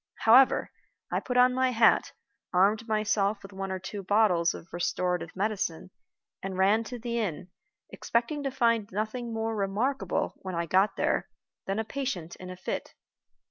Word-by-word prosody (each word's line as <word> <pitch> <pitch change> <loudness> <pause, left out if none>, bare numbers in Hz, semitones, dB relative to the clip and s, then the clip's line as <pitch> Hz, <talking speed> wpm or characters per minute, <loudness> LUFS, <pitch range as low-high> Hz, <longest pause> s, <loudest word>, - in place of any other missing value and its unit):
However, 250 +4 +5 0.4
I - - +1
put 250 -1 -3
on 250 0 +6
my 260 0 +2
hat, 230 -2 +3 0.4
armed 205 +5 +3
myself 215 -2 +1
with 195 - -11
one 195 0 -4
or 190 - -2
two 195 +2 -6
bottles 190 -4 +3
of 165 - -12
restorative 175 0 -1
medicine, 190 -3 -2 0.5
and 190 -1 -5
ran 200 +4 +3
to 245 - -6
the 235 0 -3
inn, 180 -4 -3 0.4
expecting 240 +6 -1
to 275 - -1
find 230 -5 +1
nothing 220 +4 -3
more 225 0 -2
remarkable, 205 +1 -1
when 185 -2 -6
I 170 0 -1
got 190 +5 +2
there, - - 0 0.4
than 195 +1 -1
a 220 - 0
patient 220 -10 -4
in 185 - -9
a 185 - -8
fit. 185 - -5
210 Hz, 165 wpm, -28 LUFS, 185-235 Hz, 0.5 s, on